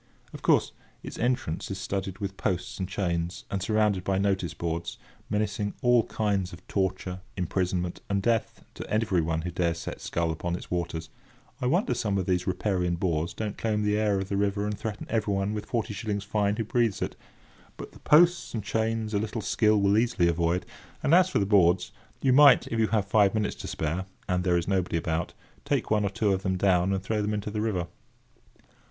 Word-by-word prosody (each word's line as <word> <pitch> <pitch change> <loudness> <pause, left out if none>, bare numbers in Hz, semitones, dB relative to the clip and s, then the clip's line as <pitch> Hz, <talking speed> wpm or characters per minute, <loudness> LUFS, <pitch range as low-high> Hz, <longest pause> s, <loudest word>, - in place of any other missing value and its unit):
Of - - -8
course, - - +3 0.3
its - - -7
entrance 120 -9 -1
is 95 - -4
studded 95 0 -3
with 100 -1 -4
posts 90 -2 -2
and 95 -1 -3
chains, 85 -3 -2
and 100 - -1
surrounded 105 -2 +1
with 95 -1 +2
notice 95 -4 0
boards, 85 0 -3 0.3
menacing 105 -1 -1
all 120 -2 +4
kinds 100 -4 -1
of 85 - -13
torture, 95 -1 -2 0.2
imprisonment, 90 0 -1
and 100 0 +1
death 115 +2 0
to - - -8
everyone 85 -7 +1
who 90 - -3
dares 85 0 0
set 85 - -6
scull 85 -1 -1
upon 85 +2 -3
its - - -9
waters—I 120 - -5
wonder 180 - +2
some 100 -3 -1
of 95 - -1
these 90 -1 0
riparian 90 -2 0
boors 85 -2 -1
don't 105 -2 -4
claim 105 -2 0
the 105 0 +2
air 105 -2 +2
of 95 - -3
the 100 - -1
river 100 0 0
and 105 0 -2
threaten 110 0 -5
everyone 105 -2 0
with 105 - -5
forty 115 -3 -2
shillings 105 -2 -3
fine 105 0 0
who 115 - -1
breathes 115 -3 +1
it—but - - -11
the - - -16
posts 170 -1 +4
and 110 - -3
chains 110 +1 -1
a 100 - +2
little 110 +2 -3
skill 110 0 +3
will 100 +2 +4
easily 110 -7 +2
avoid; 85 +1 +1 0.4
and 145 - +3
as 185 +1 +6
for - - 0
the 100 - +2
boards, 90 -3 +3 0.3
you 130 -2 +4
might, 145 0 +7
if 115 - -1
you 110 - +3
have 105 -2 +1
five 100 +1 +3
minutes 105 -1 0
to - - -7
spare, 80 +5 -2 0.2
and 90 0 0
there 90 -1 +3
is 85 - -2
nobody 95 -3 0
about, 80 0 -2 0.3
take - - -1
one 105 -1 +3
or 100 - +1
two 100 0 +1
of 95 - -1
them 95 -1 -1
down 90 -1 +3
and 95 -1 -1
throw 105 +1 -1
them 105 +1 -1
into 105 0 -4
the 105 0 -2
river. 100 -6 -1
100 Hz, 200 wpm, -27 LUFS, 90-110 Hz, 0.4 s, might